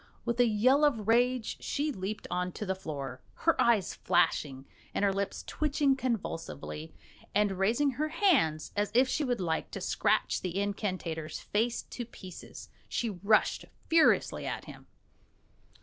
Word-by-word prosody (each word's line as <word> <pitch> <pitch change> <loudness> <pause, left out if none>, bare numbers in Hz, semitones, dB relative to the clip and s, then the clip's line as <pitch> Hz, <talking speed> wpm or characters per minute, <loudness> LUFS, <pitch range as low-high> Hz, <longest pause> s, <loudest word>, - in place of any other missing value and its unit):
With 235 0 -1
a 245 - +6
yell 255 +7 +4
of 230 -8 +2
rage 245 +1 +2
she 295 +2 -1
leaped 200 -2 -5
on 180 0 -1
to 210 - -5
the 190 - 0
floor, 140 -8 -6 0.2
her 330 - +4
eyes 230 -5 +3
flashing, 140 -6 +1 0.3
and 205 - +2
her 195 - +2
lips 200 0 -3
twitching 290 -2 +1
convulsively; 165 - -4 0.4
and 210 -1 +3
raising 235 +9 +2
her 295 +5 -1
hands 305 - +2
as 205 0 +1
if 255 +2 +6
she 295 - 0
would 245 -3 0
like 165 -3 -1
to - - -6
scratch 215 +3 +1
the 185 +1 -2
incantator's 185 -6 -3
face 230 +3 0
to 245 - -6
pieces, 185 -6 -10 0.2
she 230 -2 -1
rushed 200 +3 +2 0.2
furiously 325 -1 +3
at - - -4
him. - - -12
210 Hz, 150 wpm, -30 LUFS, 185-255 Hz, 0.4 s, a